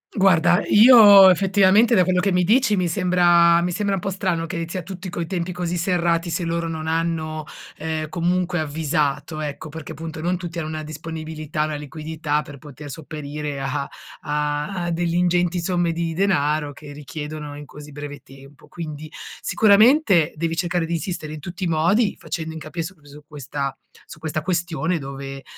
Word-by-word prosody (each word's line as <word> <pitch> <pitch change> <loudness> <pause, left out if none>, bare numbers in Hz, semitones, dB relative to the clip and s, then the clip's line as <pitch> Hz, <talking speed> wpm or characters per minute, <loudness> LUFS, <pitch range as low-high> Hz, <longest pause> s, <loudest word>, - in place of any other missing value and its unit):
Guarda, 185 -1 +4
io, 205 -4 +9
effettivamente, 195 +5 +4
da 185 -5 +5
quello 180 -1 +2
che 200 - +1
mi 180 -1 +2
dici, 220 -1 +3
mi 180 -1 +1
sembra 175 -1 +4
mi 180 +1 -1
sembra 200 +1 0
un - - -3
po' 195 - -2
strano 180 -3 -1
che 165 0 -4
sia 185 +1 -4
tutti 185 +2 -8
coi 170 -1 -4
tempi 180 -1 -3
così 175 -1 -3
serrati, 170 -1 0
se 170 +1 -2
loro 165 0 -2
non 160 -1 -5
hanno, 160 -1 -1 0.3
ehm, 155 0 -3
comunque 175 +1 0
avvisato. 150 0 -1
Ecco 150 +1 -5
perché, 160 +1 -8
appunto, 160 +1 -7
non 180 +2 0
tutti 170 -1 -7
hanno 155 -2 -3
una 155 0 -5
disponibilità, 155 0 -4
una 155 - -3
liquidità 150 +1 -3
per 145 -2 -11
poter 145 0 -11
sopperire 150 -1 -6
a 140 +1 -3 0.3
a 150 +5 -2
a 175 - -2
delle 170 0 -1
ingenti 175 0 +1
somme 175 -1 0
di 165 0 -2
denaro 155 -5 +1
che 145 0 -11
richiedono 150 0 -7
in 145 - -9
così 150 +2 -12
breve 145 0 -8
tempo. 135 +1 -17
Quindi 155 -2 -7 0.3
sicuramente 215 - +4
devi 165 0 -1
cercare 175 -1 -1
di 170 - -4
insistere 165 -3 -4
in 155 - -7
tutti 180 +3 -5
i - - 0
modi, 180 +8 +2
facendo 160 -1 -5
incapi 160 +1 -5
su 190 +4 -8
que 145 -2 -22
su 150 +1 -13
questa 140 -2 -5 0.3
su - - -12
questa 155 -1 -3
questione 170 -1 -1
dove, 135 -1 -7
165 Hz, 180 wpm, -22 LUFS, 150-180 Hz, 0.3 s, io